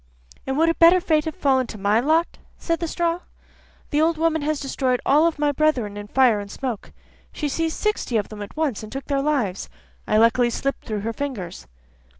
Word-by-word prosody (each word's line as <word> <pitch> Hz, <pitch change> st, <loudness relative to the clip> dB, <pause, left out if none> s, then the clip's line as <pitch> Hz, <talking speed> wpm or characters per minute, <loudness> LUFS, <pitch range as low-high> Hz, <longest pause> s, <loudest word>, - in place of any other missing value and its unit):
'And 265 Hz, +1 st, -1 dB
would 325 Hz, +2 st, +4 dB
a 330 Hz, -, +3 dB
better 340 Hz, +2 st, +6 dB
fate 315 Hz, -3 st, +1 dB
have 315 Hz, -, -4 dB
fallen 265 Hz, -8 st, +2 dB
to 220 Hz, -, -8 dB
my 205 Hz, +2 st, +2 dB
lot?' 315 Hz, +6 st, +1 dB, 0.2 s
said 335 Hz, -1 st, -2 dB
the 335 Hz, -, -2 dB
straw. 340 Hz, +1 st, -1 dB, 0.7 s
'The 295 Hz, -, +2 dB
old 325 Hz, 0 st, +2 dB
woman 320 Hz, -1 st, +1 dB
has 300 Hz, 0 st, -1 dB
destroyed 260 Hz, -2 st, -1 dB
all 310 Hz, +4 st, +4 dB
my 295 Hz, 0 st, +1 dB
brethren 265 Hz, -9 st, 0 dB
in 205 Hz, 0 st, -7 dB
fire 245 Hz, -2 st, +3 dB
and 200 Hz, 0 st, -7 dB
smoke; 245 Hz, -1 st, -5 dB, 0.4 s
she 300 Hz, -, -3 dB
seized 325 Hz, +3 st, -2 dB
sixty 425 Hz, -, -1 dB
of 205 Hz, -, -2 dB
them 215 Hz, -1 st, -9 dB
at 205 Hz, +8 st, -9 dB
once, 300 Hz, -9 st, -1 dB
and 215 Hz, -, -9 dB
took 270 Hz, 0 st, -6 dB
their 275 Hz, -1 st, 0 dB
lives. 265 Hz, -11 st, -1 dB, 0.4 s
I 215 Hz, -, +2 dB
luckily 230 Hz, +2 st, +4 dB
slipped 275 Hz, +3 st, -3 dB
through 215 Hz, -2 st, -3 dB
her 225 Hz, +2 st, -3 dB
fingers. 235 Hz, -, -6 dB
275 Hz, 205 wpm, -23 LUFS, 225-315 Hz, 0.7 s, better